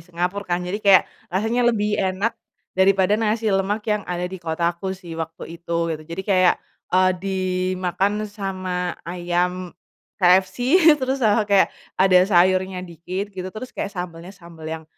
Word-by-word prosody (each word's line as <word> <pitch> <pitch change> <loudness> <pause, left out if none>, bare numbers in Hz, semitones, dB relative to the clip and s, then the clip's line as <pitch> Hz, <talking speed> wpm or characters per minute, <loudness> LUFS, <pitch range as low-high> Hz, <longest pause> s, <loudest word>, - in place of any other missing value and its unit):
Singapura 180 +3 -2
kan 180 - -5
jadi 195 +4 -3
kayak 195 -3 +6 0.3
rasanya 225 +6 +1
lebih 210 -2 0
enak, 190 +4 0 0.4
daripada 190 +1 +3
nasi 220 -1 +1
lemak 200 +2 0
yang 210 -1 0
ada 180 0 -2
di 185 0 -6
kotaku 170 +3 -2
sih 175 -3 -10
waktu 165 +1 -7
itu 170 -1 -1
gitu 155 - -6
jadi 170 +3 -5
kayak, 185 -1 +5 0.4
eee, 185 0 +5
dimakan 185 +2 -1
sama 185 -3 -4
ayam, 180 +1 -2 0.4
KFC 190 - +3 0.2
terus 265 -1 -2
sama 215 -2 +3
kayak 200 -2 +4 0.3
ada 190 -1 +5
sayurnya 185 0 +2
dikit 180 +4 -5
gitu 185 0 -4
terus 240 +4 -7
kayak 200 - -3
sambelnya-sambel 170 -2 -9
yang, 160 0 -5
185 Hz, 145 wpm, -22 LUFS, 175-200 Hz, 0.4 s, kayak